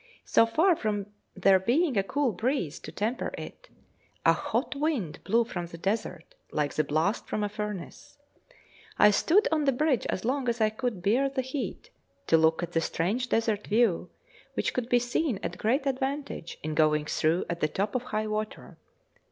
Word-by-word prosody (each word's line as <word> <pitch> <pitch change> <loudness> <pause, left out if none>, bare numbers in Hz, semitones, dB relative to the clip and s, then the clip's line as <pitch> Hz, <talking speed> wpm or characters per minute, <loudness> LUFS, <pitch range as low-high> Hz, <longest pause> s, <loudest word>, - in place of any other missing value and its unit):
So 230 - +4
far 330 +10 +3
from 205 -5 -3 0.2
there 190 0 +5
being 260 - +2
a 195 - +4
cool 275 +6 0
breeze 210 - -1
to 155 - -9
temper 220 +9 -2
it, - - -9 0.6
a - - +7
hot - - -2
wind 275 - -2
blew 230 +4 +3
from 175 -7 -5
the 170 - -10
desert, 180 -2 -3 0.2
like 150 -2 -1
the 155 - +1
blast 155 +9 0
from 210 - -2
a 205 - -1
furnace. 210 +5 -6 0.8
I 210 - +7
stood 395 - +3
on 305 -2 +2
the 275 - +4
bridge 270 -1 +1
as 185 - -3
long 260 0 0
as 235 0 -1
I 215 -1 +3
could 220 -5 -3
bear 250 +8 +3
the 270 -1 -2
heat, 260 -4 -5 0.3
to - - +4
look 160 +1 +3
at 175 - -4
the 165 - +1
strange 215 +11 -1
desert 220 -2 0
view, 210 -5 +2 0.5
which - - 0
could 250 -1 -2
be 245 - +5
seen 245 +1 0
to - - -3
great 260 +6 0
advantage 270 - -3
in 155 0 -2
going 150 -1 +3
through 160 +3 +1
at 170 0 -3
the 155 - +2
top 200 +6 -2
of 250 0 -2
high 215 -3 -2
water. 215 0 -5
215 Hz, 185 wpm, -28 LUFS, 180-260 Hz, 0.8 s, a